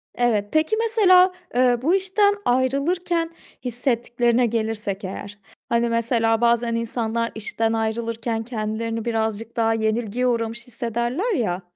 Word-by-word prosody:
Evet. 230 -4 +1
Peki, 315 +8 +2
mesela, 400 -5 +5 0.2
eee, 245 -1 +4
bu 325 +8 +3
işten 395 +2 +2
ayrılırken 325 +7 +1 0.4
hissettiklerine 240 0 +1
gelirsek 220 -3 -2
eğer, 200 +2 -7 0.3
hani, 235 0 +2
mesela 230 -1 +1
bazen 235 0 +2
insanlar 230 0 -2
işten 225 +1 -1
ayrılırken 225 0 -2
kendilerini 225 0 -3
birazcık 225 -1 -2
daha 225 -1 +2
yenilgiye 225 +2 0
uğramış 230 0 -2
hissederler 240 - -2
ya, 185 -7 -1
235 Hz, 115 wpm, -23 LUFS, 225-255 Hz, 0.4 s, mesela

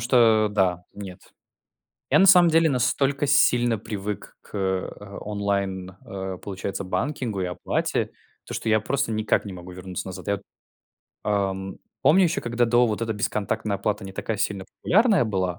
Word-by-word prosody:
что 115 -3 +4
да, 90 -3 +1
нет. 95 -3 -8 0.9
Я - - +5
на 195 - +7
самом 180 -3 +7
деле 165 0 +4
настолько 135 +2 +1
сильно 120 -4 +4
привык 105 -1 -6
к, - - -13
э, 95 +1 -3
онлайн, 100 -2 -2
э, 95 -1 -5
получается, 100 0 -4
банкингу 105 +2 -2
и - - 0
оплате, 90 - -1 0.3
то - - -7
что 110 - -2
я 110 0 +4
просто 135 +2 -1
никак 110 -1 +1
не 100 - -6
могу 90 0 -9
вернуться 90 0 -6
назад. 95 - -8
Я 100 - +2
вот, - - -17 0.8
ам, 95 -2 -1 0.3
помню, 185 +4 +6
еще 170 +4 +1
когда 120 0 +1
до 120 +1 +4
вот 110 +1 -2
эта 110 -1 -1
бесконтактная 105 0 -1
оплата 105 +1 -2
не 95 - -8
такая 110 +2 -3
сильно 100 -1 -2 0.2
популярная 205 - +4
была, 95 -4 -1
105 Hz, 165 wpm, -25 LUFS, 95-120 Hz, 0.9 s, на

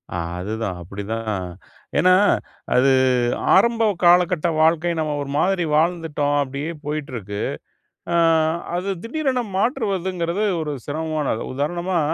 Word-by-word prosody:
ஆ - - -1 0.2
அதுதான் 105 0 -3
அப்டிதான். 100 +5 -5 0.7
ஏன்னா, 185 +1 +5 0.6
அது 135 +2 +5 0.6
ஆரம்ப 230 +3 +4 0.2
காலகட்ட 175 -1 +4
வாழ்க்கை, 165 +2 +3
நம்ம 155 -1 -1
ஒரு 140 - -5
மாதிரி 180 +2 +2
வாழ்ந்துட்டோம். 155 -3 +1
அப்டியே 140 +4 -5
போயிட்டிருக்கு, 125 -9 -4 0.7
அ - - +2 0.6
அது 180 +3 -2
திடீரென 265 0 -1 0.2
மாற்றுவதுங்கிறது, 195 - -1 0.2
ஒரு 150 -1 -3
சிரமமானது. 155 -5 -2
உதாரணமா, 175 +5 -1
160 Hz, 105 wpm, -22 LUFS, 140-185 Hz, 0.7 s, ஏன்னா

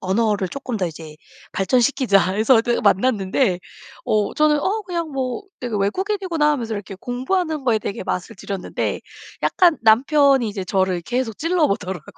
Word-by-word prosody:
언어를 200 0 0
조금 255 -2 -5
더 185 - 0
이제 155 -1 -9 0.4
발전시키자 230 -2 +2
해서 220 +6 +3
어떻게 235 +1 +2
만났는데 200 -1 +2 0.4
어 210 -1 +1
저는 300 -1 +3
어 410 +9 -1
그냥 340 -3 -3
뭐 265 +4 -3 0.2
되게 245 -3 -4
'외국인이구나.' 340 - 0
하면서 235 -6 -3
이렇게 205 -2 -5
공부하는 275 - -2
거에 230 -4 +3
되게 215 +1 -5
맛을 180 - -3
들였는데 195 -2 -4 0.4
약간 350 -4 +3
남편이 265 +2 +4
이제 200 -2 -5
저를 185 -2 0
계속 240 +2 -2
찔러 330 -1 +1
보더라고요. 185 -4 -3
235 Hz, 370 characters per minute, -21 LUFS, 195-290 Hz, 0.4 s, 남편이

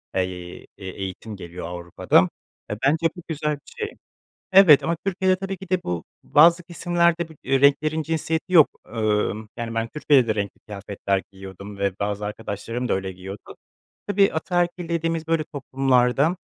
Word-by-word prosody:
eee, 90 -1 -3 0.2
e 95 - -10
eğitim 95 +3 -6
geliyor 90 -1 -8
Avrupa'da. 85 -1 +2 0.4
E, - - 0
bence 160 +4 +3
bu 175 - -9
güzel 150 -1 -1
bir 145 - -17
şey. 435 -1 -3 0.6
Evet 185 -7 +8
ama 170 0 0
Türkiye'de 190 -1 +2
tabii 195 0 -4
ki 190 0 -11
de 185 -1 +1
bu 85 -2 -3 0.2
bazı 170 +4 +6
kesimlerde, 170 -1 +1
bu - - -13
renklerin 140 +4 +3
cinsiyeti 160 +2 -2
yok. 160 -5 +8 0.2
Emm, 110 -1 -1
yani, 115 -1 -4
ben 115 0 -1
Türkiye'de 140 -3 +3
de 110 - +2
renkli 100 -2 -3
kıyafetler 100 -1 -2
giyiniyordum 95 +1 -10
ve 100 -1 0
bazı 105 0 -2
arkadaşlarım 110 +3 -4
da - - +1
öyle 95 0 -3
giyiniyordu. 95 +2 -10 0.5
Tabii, 200 -1 +3
ataerkil 175 +1 -1
dediğimiz 165 -1 -1
böyle 165 -1 +1
toplumlarda, 135 +1 +1
135 Hz, 155 wpm, -23 LUFS, 100-165 Hz, 0.6 s, Evet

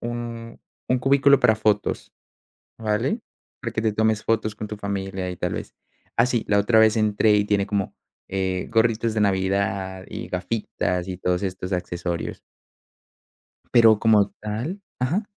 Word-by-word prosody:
un 120 -1 -6 0.3
un 130 - +2
cubículo 140 +2 +5
para 120 -3 +5
fotos, 105 -1 0 0.7
¿vale?, 115 - 0 0.4
para 115 -4 -4
que 110 - -1
te 110 -1 +1
tomes 110 0 +1
fotos 110 -1 0
con 105 - -6
tu 105 - -5
familia 95 -2 -3
y 90 - -6
tal - - -2
vez. - - -6 0.4
Ah, 115 - +5
sí, 120 -3 0
la 100 - +4
otra 110 +2 +3
vez 110 0 +5
entré 105 0 +3
y 105 0 +3
tiene 100 -1 +1
como, 100 -2 -2 0.3
eh, 95 -1 -2
gorritos 115 0 +2
de 110 - 0
Navidad 95 -1 0
y 110 +2 -6
gafitas 90 -1 -2
y 90 - -4
todos 90 0 -1
estos 95 -1 -4
accesorios. 90 -1 -3 1.3
Pero 115 -3 +7
como 105 -2 +4
tal 115 - -4 0.2
Ajá. 165 - 0
105 Hz, 155 wpm, -24 LUFS, 95-115 Hz, 1.3 s, Pero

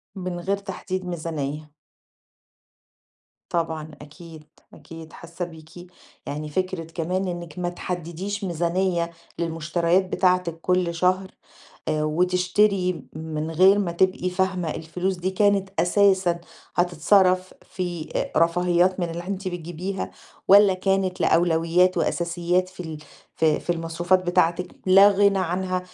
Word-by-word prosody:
من 180 -2 -4
غير 195 +3 -1
تحديد 185 -1 -5
ميزانية. 155 -3 -4 1.8
طبعًا، 160 -2 -2
أكيد. 155 +1 -12 0.3
أكيد 165 -1 -12
حاسة 170 +1 -6
بيكِ، 160 -2 -13 0.6
يعني 150 +1 -5
فكرة 185 +2 -2
كمان 175 +3 -3
إنِك 175 -1 -6
ما 175 - -1
تحددّيش 180 +3 -5
ميزانية 170 0 0 0.3
للمشتريات 170 +2 +1
بتاعتِك 180 -3 +1
كل 180 -1 +1
شهر، 185 +2 +1 0.6
آآ، 155 -1 0
وتشتري 180 +3 +1
من 155 0 -4
غير 190 +5 +5
ما 185 -4 -1
تبقي 185 +1 +1
فاهمة 180 -3 -1
الفلوس 180 +4 -3
دي 180 +2 -2
كانت 200 0 +2
أساسًا 190 -2 +3 0.4
هتتصرف 185 +2 +3
في 175 -4 -5
أ - - -1
رفاهيات 180 +2 +2
من 175 -2 -1
اللي 170 +2 -6
أنتِ 195 -1 -4
بتجيبيها 175 +2 -5 0.4
والّا 200 0 +7
كانت 190 0 0
لأولويات 170 +2 +3
وأساسيات 175 +2 0
في 185 - -21
ال 160 -2 -6 0.4
ف 160 - +2
في 155 +2 +1
المصروفات 175 +2 +1
بتاعتِك 175 0 +1
لا 195 +2 +7
غنى 200 0 +3
عنها 185 +1 -1
175 Hz, 120 wpm, -24 LUFS, 165-185 Hz, 1.8 s, والّا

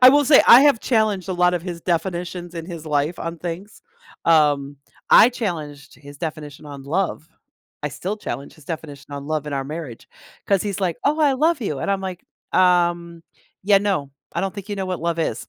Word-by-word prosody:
I 255 - +11
will 290 +2 +5
say, 280 +1 +7
I 245 - +10
have 280 -6 +4
challenged 215 -6 0
a - - -1
lot 180 0 +2
of 175 - -2
his 175 -2 -6
definitions 175 0 -3
in 165 -1 -6
his 170 -3 -8
life 150 +3 0
on 165 0 -5
things. 180 +5 -7 0.4
Um, 145 -3 +3 0.3
I 230 - +8
challenged 155 - -5
his 145 0 -13
definition 150 -2 -6
on 140 -2 -9
love. 165 +1 -2 0.5
I 150 - -1
still 195 +8 -4
challenge 140 -8 -6
his 155 - -18
definition 145 -3 -7
on 140 0 -6
love 155 -1 -2
in 150 - -5
our 135 -1 -2
marriage, 145 -5 -8 0.4
'cause 195 -2 +2
he's, 200 -2 -4
like, 175 -4 0
"Oh, 295 +2 +2
I 290 -3 +4
love 310 +2 +2
you." 155 -10 -3
And - - -1
I'm, 195 -1 0
like, 185 -2 -6 0.3
"Um, 175 -2 +2 0.4
yeah, 200 0 +5
no 195 -9 -1 0.2
I - - 0
don't 195 -1 -3
think 200 0 -8
you 205 - -3
know 190 -1 -3
what 185 -2 -3
love 170 0 -1
is." 125 -8 -2
175 Hz, 210 wpm, -22 LUFS, 150-195 Hz, 0.5 s, I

